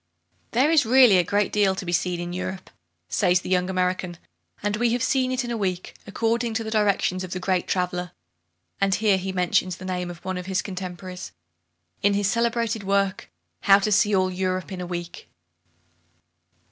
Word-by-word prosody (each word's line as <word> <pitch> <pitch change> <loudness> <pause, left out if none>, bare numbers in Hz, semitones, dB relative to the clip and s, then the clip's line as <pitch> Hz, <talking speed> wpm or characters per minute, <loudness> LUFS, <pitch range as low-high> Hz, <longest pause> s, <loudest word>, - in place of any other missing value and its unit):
"There 265 +7 +3
is 315 -3 +5
really 240 -5 +6
a - - +3
great 205 +3 0
deal 200 -2 +3
to 190 - -6
be 175 - -3
seen 175 0 0
in 175 0 -5
Europe," 185 +1 -5 0.4
says 180 - +2
the 185 - -6
young 180 0 +2
American, 185 -1 -1 0.5
"and 205 0 0
we 235 0 +2
have 245 - 0
seen 260 -1 +1
it 255 0 0
in 240 - -4
a 235 - -2
week, 185 -3 -3
according 230 +2 -1
to 225 - -1
the 220 - -5
directions 200 -3 +1
of 185 - -6
the 185 - -3
great 185 -1 0
traveller" 180 -1 -1 0.7
(and 195 -1 +2
here 210 -3 +3
he 190 +1 -4
mentions 180 0 0
the 185 - -9
name 180 -1 -3
of 175 +1 -10
one 185 -1 -2
of 180 - -8
his 190 -1 0
contemporaries) 180 - -7 0.7
"in 200 0 +3
his 200 -1 +1
celebrated 230 0 0
work, 195 -1 0 0.3
'How 195 - +6
to 205 +1 -1
See 205 +1 +4
All 185 -1 +2
Europe 185 0 -2
in 185 -1 -5
a 180 - -5
Week.'" 175 0 -6
190 Hz, 195 wpm, -24 LUFS, 180-210 Hz, 0.7 s, really